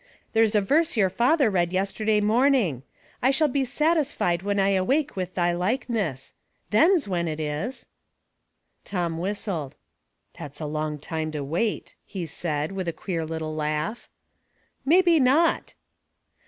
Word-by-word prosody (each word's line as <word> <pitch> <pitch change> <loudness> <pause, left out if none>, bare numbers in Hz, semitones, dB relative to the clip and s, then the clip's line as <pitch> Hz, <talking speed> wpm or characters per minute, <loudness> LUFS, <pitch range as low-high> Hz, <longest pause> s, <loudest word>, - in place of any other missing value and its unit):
*' - - -39
There's 225 -1 +3
a 210 - +4
verse 300 +7 +2
your 190 -3 +3
father 245 - +3
read 175 -2 +1
yesterday 210 +3 0
morning, 220 - +2 0.2
* - - -31
I 255 - +4
shall 275 +3 +3
be 275 0 0
satisfied 280 - +1
when 200 +1 -1
I 195 0 +3
awake 265 +11 +1
with 185 -1 -4
thy 175 -1 +2
likeness.' 190 - -2 0.4
Then's 320 - +4
when 175 -3 -1
it 155 -1 -3
is." 155 - -4 1.0
Tom 170 -4 -2
whistled. 185 -6 -3 0.3
'' - - -34
That's 145 -1 -9
a 155 - -4
long 150 0 -3
time 155 +1 -4
to 150 -2 -3
wait," 175 +10 -2
he 190 -4 -6
said, 155 -1 -3
with 190 -2 -4
a 170 - -1
queer 165 -3 -3
little 160 -1 -4
laugh. 155 +7 -3 0.4
" - - -46 0.3
Maybe 345 +2 +5
not." 290 +6 +2
195 Hz, 155 wpm, -25 LUFS, 160-255 Hz, 1.0 s, Maybe